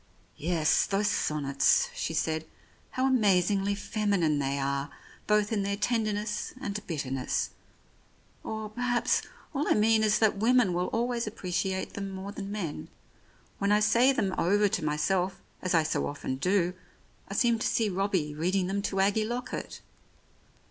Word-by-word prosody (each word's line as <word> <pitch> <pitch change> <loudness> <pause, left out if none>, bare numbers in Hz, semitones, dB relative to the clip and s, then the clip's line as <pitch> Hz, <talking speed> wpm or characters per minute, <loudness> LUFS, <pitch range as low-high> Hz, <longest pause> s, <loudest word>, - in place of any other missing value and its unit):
" - - -36 0.2
Yes, 160 -3 +3
those 205 +1 +1
sonnets," 140 -2 +2
she 165 - -3
said. 160 0 -1 0.2
" - - -33
How 255 - +1
amazingly 200 -5 +3
feminine 200 -8 0
they 140 0 -1
are, 140 +1 -1 0.4
both 210 0 +2
in 205 - +1
their 200 0 -1
tenderness 215 -1 -1
and 210 -5 -4
bitter 145 -6 -3
ness. 135 -1 -1 0.9
Or, 220 0 -4
perhaps, 245 +1 +1 0.3
all 290 +1 -1
I - - +4
mean 220 +1 +4
is 210 -1 +3
that 220 -2 +2
women 235 -3 +4
will 180 +1 0
always 235 0 -1
appreciate 190 -1 -2
them 195 -1 -4
more 190 +1 -6
than 200 -1 -6
men. 185 -8 -4 0.7
When 200 +1 +1
I 210 - +5
say 235 +5 +4
them 200 -8 0
over 205 +4 +3
to - - -2
myself, 180 +5 0 0.2
as 185 -1 0
I 160 - +4
so 155 - -1
often 140 -2 -4
do, 180 +3 +1 0.5
I - - -6
seem 235 -2 +3
to - - 0
see 225 - +1
Robbie 185 -6 -1
reading 180 +5 0
them 195 +2 -1
to 195 -1 0
Aggie 205 +3 +2
Lockett. 240 +3 -5
200 Hz, 160 wpm, -29 LUFS, 170-215 Hz, 0.9 s, I